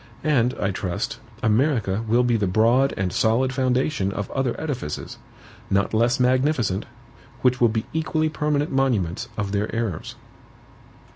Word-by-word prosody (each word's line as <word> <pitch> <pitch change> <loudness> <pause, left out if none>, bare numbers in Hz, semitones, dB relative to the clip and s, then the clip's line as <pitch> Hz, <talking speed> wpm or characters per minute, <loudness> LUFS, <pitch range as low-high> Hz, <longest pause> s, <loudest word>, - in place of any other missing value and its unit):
And, 130 -5 +2
I 100 - -1
trust, 90 -2 -3 0.2
America 110 -3 +1
will 120 +3 +3
be 120 -1 +2
the 105 -3 +1
broad 115 +8 +3
and 95 -2 -1
solid 125 +4 +2
foundation 130 -4 0
of 100 0 -4
other 135 -3 -1
edifices, 130 - -5 0.5
not 100 +2 +1
less 120 +4 +2
magnificent, 125 -5 +1 0.6
which 125 -1 +3
will 120 - +6
be 110 0 -2
equally 155 0 0
permanent 150 -1 -1
monuments 120 -6 0
of 100 -2 -2
their 105 +1 -1
errors. 110 -8 -3
120 Hz, 140 wpm, -23 LUFS, 105-135 Hz, 0.6 s, will